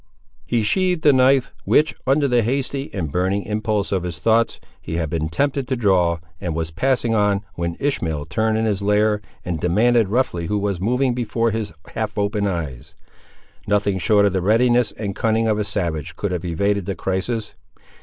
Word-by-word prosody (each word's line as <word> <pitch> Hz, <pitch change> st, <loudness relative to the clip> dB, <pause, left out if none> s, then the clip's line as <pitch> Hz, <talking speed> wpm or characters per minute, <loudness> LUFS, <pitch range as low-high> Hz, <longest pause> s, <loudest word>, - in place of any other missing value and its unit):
He 120 Hz, -2 st, +1 dB
sheathed 180 Hz, -, +1 dB
the 145 Hz, -, +6 dB
knife, 130 Hz, 0 st, +3 dB
which, 155 Hz, +1 st, +3 dB
under 140 Hz, +2 st, +3 dB
the 125 Hz, -2 st, +3 dB
hasty 135 Hz, +4 st, -2 dB
and 85 Hz, -7 st, -3 dB
burning 95 Hz, +4 st, 0 dB
impulse 105 Hz, -1 st, -1 dB
of 95 Hz, -2 st, +1 dB
his 85 Hz, -2 st, -4 dB
thoughts, 115 Hz, +5 st, +2 dB, 0.2 s
he 80 Hz, -, -5 dB
had 80 Hz, -3 st, -2 dB
been 80 Hz, -1 st, -1 dB
tempted 140 Hz, -, -1 dB
to 130 Hz, -, 0 dB
draw, 95 Hz, -7 st, +2 dB, 0.2 s
and 85 Hz, -3 st, -3 dB
was 80 Hz, 0 st, -2 dB
passing 120 Hz, -, +1 dB
on, 105 Hz, -1 st, +1 dB
when 85 Hz, -1 st, -3 dB
Ishmael 80 Hz, -, -1 dB
turned 110 Hz, +7 st, 0 dB
in 110 Hz, -, 0 dB
his 100 Hz, -3 st, 0 dB
lair, 105 Hz, +1 st, +2 dB, 0.2 s
and 85 Hz, -3 st, -2 dB
demanded 110 Hz, +6 st, +3 dB
roughly 105 Hz, -8 st, 0 dB
who 105 Hz, -, 0 dB
was 100 Hz, -3 st, -2 dB
moving 125 Hz, +5 st, +1 dB
before 115 Hz, -1 st, 0 dB
his 110 Hz, -3 st, -3 dB, 0.2 s
half -, -, -3 dB
opened 100 Hz, 0 st, 0 dB
eyes. 75 Hz, -9 st, -5 dB, 0.7 s
Nothing 100 Hz, -1 st, +1 dB
short 105 Hz, +2 st, +4 dB
of 100 Hz, -, +2 dB
the 95 Hz, -, 0 dB
readiness 120 Hz, +4 st, +3 dB
and 100 Hz, -3 st, -5 dB
cunning 115 Hz, 0 st, +1 dB
of 110 Hz, -1 st, +1 dB
a -, -, +1 dB
savage 85 Hz, -7 st, -3 dB
could 100 Hz, -, -3 dB
have 90 Hz, -1 st, -3 dB
evaded 100 Hz, +3 st, 0 dB
the 100 Hz, -, -2 dB
crisis. 105 Hz, +4 st, -2 dB
105 Hz, 185 wpm, -21 LUFS, 90-120 Hz, 0.7 s, the